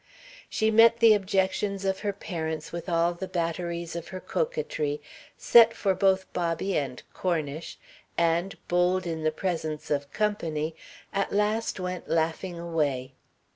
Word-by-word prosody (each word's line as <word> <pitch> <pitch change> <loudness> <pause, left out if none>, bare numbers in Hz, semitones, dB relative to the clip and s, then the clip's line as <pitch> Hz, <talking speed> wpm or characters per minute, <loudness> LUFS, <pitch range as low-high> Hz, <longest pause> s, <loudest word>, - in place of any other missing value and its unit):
She 220 0 +1
met 230 +1 +7
the 230 -2 +7
objections 195 0 0
of 190 0 0
her 205 -1 -1
parents 160 -5 -4
with 170 +2 -5
all 170 0 +2
the 185 +2 -6
batteries 170 -1 -3
of 170 - -5
her 185 - -6
coquetry, 465 - -2 0.4
set 235 -1 +7
for 195 -2 +1
both 190 0 +2
Bobby 175 +2 -1
and 135 -4 -2
Cornish 160 -3 -2 0.4
and, 170 +3 +1
bold 180 +1 +2
in 165 -2 -3
the 155 - +2
presence 160 -4 -3
of 140 -1 -1
"company," 165 -7 -1 0.4
at 195 0 0
last 210 +1 0
went 180 -1 -4
laughing 165 +2 0
away. 150 -7 -1
180 Hz, 140 wpm, -27 LUFS, 165-200 Hz, 0.4 s, met